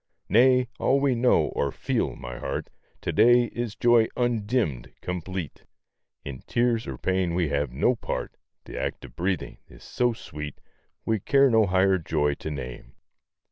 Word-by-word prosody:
Nay! 125 +2 +5
all 135 - +3
we 140 -1 +2
know, 125 +1 +3
or 70 - -1
feel, - - -1
my 60 0 -8
heart, - - -4 0.3
To - - -2
day 120 +3 +6
is 120 -3 -3
joy 120 -2 +4
undimmed, 110 - 0
complete; 90 -1 -5 0.6
In 70 -2 -6
tears 120 -1 +1
or 65 - -5
pain 95 0 0
we 85 -4 +1
have 70 -2 -1
no 80 - +2
part; - - -4 0.3
The - - -6
act - - -4
of - - -14
breathing 90 +2 -2
is - - -16
so 120 -1 0
sweet, 75 -9 -8 0.5
We 110 -1 +1
care 135 +5 +4
no 110 -2 +4
higher 95 +1 +3
joy 75 -3 0
to 80 - -6
name. 65 -5 -7
95 Hz, 160 wpm, -26 LUFS, 75-120 Hz, 0.6 s, day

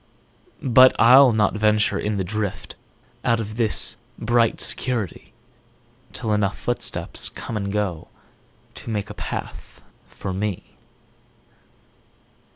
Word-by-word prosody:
But 130 0 +6
I'll 130 +3 +7
not 105 -3 +2
venture 105 0 +2
in 105 0 -2
the 95 - -1
driftOut 100 0 -4 0.5
of 110 -2 0
this 115 -3 0 0.2
bright 115 0 +1
security, 115 -9 -3 0.8
Till 110 -4 -2
enough 105 -1 0
footsteps 120 - -2
come 115 - -7
and 100 -2 -2
goTo 100 -6 -2 0.8
make 105 -2 -3
a - - -6
path - - -7 0.3
for 95 - -6
me. 100 -1 -4
105 Hz, 105 wpm, -22 LUFS, 105-115 Hz, 0.8 s, I'll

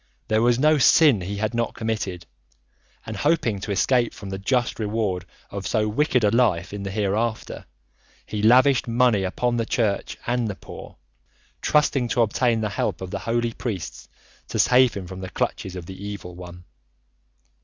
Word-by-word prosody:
There 110 0 +3
was 120 0 +3
no 155 +3 +4
sin 135 - +5
he 100 +3 -4
had 110 +2 -1
not 115 -1 -1
committed, 100 -6 -3 0.8
and 110 - -6
hoping 125 -5 +1
to 100 - -5
escape 120 +5 +2
from 100 -1 -8
the 95 - -4
just 125 +5 0
reward 105 -4 -1 0.3
of 100 -1 -5
so 110 -2 +1
wicked 125 +2 +1
a 105 - +4
life, 105 -7 +1
in 100 - -5
the 100 - -4
hereafter, 105 +3 -2 0.6
he 105 - -4
lavished 125 +4 +5
money 120 -3 +3
upon 120 +6 -1
the 115 - 0
Church 110 -5 -1
and 120 -1 0
the 100 - -4
poor, - - -11 0.6
trusting 140 -4 +2
to 120 +1 +2
obtain 115 +1 +1
the 105 - -1
help 100 - -2
of 95 -1 -7
the - - -3
holy 120 0 -1
priests 105 -9 -6 0.4
to - - -4
save 125 -3 +4
him 100 -2 -5
from 95 +1 -8
the 95 - -6
clutches 95 0 -3
of 90 -2 -7
the 95 +2 -9
Evil 100 -3 -7
One. 90 0 -11
110 Hz, 175 wpm, -23 LUFS, 100-120 Hz, 0.8 s, sin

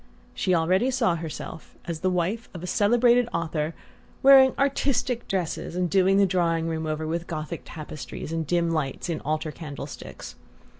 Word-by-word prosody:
She 185 - +1
already 185 +9 +2
saw 245 -8 +2
herself, 160 -1 -7
as 165 -2 -4
the 185 - +1
wife 185 +6 -1
of 175 - -7
a - - -3
celebrated 240 +4 +3
author, 160 -1 -2 0.5
wearing 265 -1 +8
"artistic" 260 -3 0
dresses 180 -3 -2
and 180 -1 0
doing 195 0 +4
the 200 - +5
drawing 170 -3 +1
room 160 -1 -2
over 155 0 -2
with 170 +2 -3
Gothic 155 +1 -5
tapestries 155 0 -7
and 165 -2 -2
dim 170 +1 +1
lights 155 +1 -2
in 165 - -2
altar 155 +1 -2
candle 150 -3 -7
sticks. 145 - -9
170 Hz, 165 wpm, -26 LUFS, 160-205 Hz, 0.5 s, wearing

